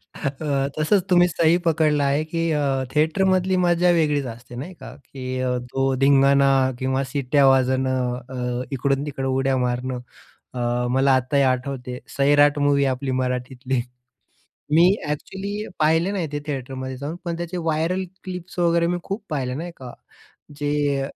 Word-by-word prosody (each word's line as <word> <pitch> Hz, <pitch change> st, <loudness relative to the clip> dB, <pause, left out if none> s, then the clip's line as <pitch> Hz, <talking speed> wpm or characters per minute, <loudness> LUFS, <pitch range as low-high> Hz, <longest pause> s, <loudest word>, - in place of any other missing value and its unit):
अ, -, -, -10 dB, 0.2 s
हं. 140 Hz, -3 st, 0 dB
तसंच 180 Hz, +5 st, +3 dB
तुम्ही 175 Hz, -1 st, +5 dB
सही 165 Hz, -1 st, +3 dB
पकडला 155 Hz, -3 st, +2 dB
आहे 140 Hz, +2 st, +1 dB
की 165 Hz, +1 st, -2 dB
अ, 140 Hz, -3 st, 0 dB
थिएटरमधली 185 Hz, +4 st, +2 dB
मज्जा 175 Hz, 0 st, +3 dB
वेगळीच 150 Hz, -4 st, +1 dB
असते 120 Hz, 0 st, -9 dB
नाही 145 Hz, +10 st, -6 dB
का? 130 Hz, -7 st, -11 dB
की 130 Hz, -2 st, -6 dB, 0.3 s
तो 135 Hz, 0 st, +1 dB
धिंगाणा 140 Hz, 0 st, +5 dB, 0.3 s
किंवा 130 Hz, +1 st, 0 dB
शिट्ट्या 140 Hz, +1 st, +2 dB
वाजवणं, 130 Hz, -1 st, +2 dB, 0.2 s
अ, 125 Hz, -1 st, -3 dB
इकडून-तिकडं 135 Hz, 0 st, -1 dB
उड्या 135 Hz, 0 st, +1 dB
मारणं. 125 Hz, 0 st, -2 dB, 0.5 s
अ, 120 Hz, 0 st, -1 dB
मला 135 Hz, +1 st, +3 dB
आताही 130 Hz, +2 st, +1 dB
आठवते 130 Hz, -1 st, -2 dB, 0.2 s
सैराट 145 Hz, +1 st, +4 dB
मूव्ही 145 Hz, -1 st, +3 dB
आपली 130 Hz, +1 st, -4 dB
मराठीतली. 125 Hz, 0 st, -2 dB, 0.9 s
मी 165 Hz, +2 st, +6 dB, 0.2 s
एक्चुअली 200 Hz, +7 st, -4 dB
पाहिले 160 Hz, +4 st, +3 dB
नाही 185 Hz, -5 st, -2 dB
ते 145 Hz, -, -2 dB
थिएटरमध्ये 130 Hz, -2 st, -4 dB
जाऊन 145 Hz, +5 st, -5 dB
पण 170 Hz, -1 st, -3 dB
त्याचे 175 Hz, +1 st, -4 dB
व्हायरल 165 Hz, +3 st, 0 dB, 0.2 s
क्लिप्स 180 Hz, -1 st, -8 dB
वगैरे 170 Hz, -1 st, +3 dB
मी 175 Hz, +1 st, 0 dB
खूप 200 Hz, +2 st, -5 dB
पाहिले 135 Hz, -5 st, -2 dB
नाही 170 Hz, +5 st, -5 dB
का. 125 Hz, -2 st, -9 dB, 0.6 s
जे 145 Hz, -1 st, 0 dB
140 Hz, 145 wpm, -23 LUFS, 130-165 Hz, 0.9 s, मी